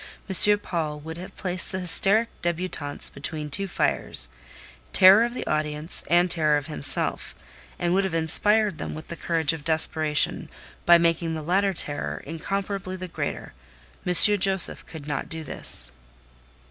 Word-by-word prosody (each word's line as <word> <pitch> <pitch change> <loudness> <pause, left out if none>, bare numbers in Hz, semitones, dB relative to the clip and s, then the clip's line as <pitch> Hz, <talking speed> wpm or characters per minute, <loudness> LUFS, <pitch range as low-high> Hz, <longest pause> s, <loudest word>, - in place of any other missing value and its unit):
M. 205 +2 +3
Paul 160 -7 -5
would 160 +2 -9
have 180 - -11
placed 180 -1 0
the 190 - -4
hysteric 200 +6 +6
débutantes 170 -4 -3
between 150 +1 -5
two 195 +6 -3
fires—terror 60 - +1
of 240 +1 -4
the - - -6
audience, 150 +1 -2
and 175 +1 +3
terror 155 -3 +2
of 145 - -6
himself—and 160 +3 -1
would 195 +1 +1
have 190 -3 -4
inspired 205 +4 +1
them - - -6
with 155 - -11
the 170 - -6
courage 165 -2 -1
of 160 -3 -9
desperation, 155 -1 0 0.4
by 175 0 +7
making 165 -1 -1
the 155 - -7
latter 190 +4 0
terror 75 - -3
incomparably 190 +4 -5
the 185 0 -8
greater: 170 - -6 0.5
M. 180 - -2 0.3
Josef 190 -1 +1
could 155 -3 -11
not 150 -2 -5
do 160 0 -6
this. - - -2
165 Hz, 145 wpm, -23 LUFS, 150-185 Hz, 0.5 s, by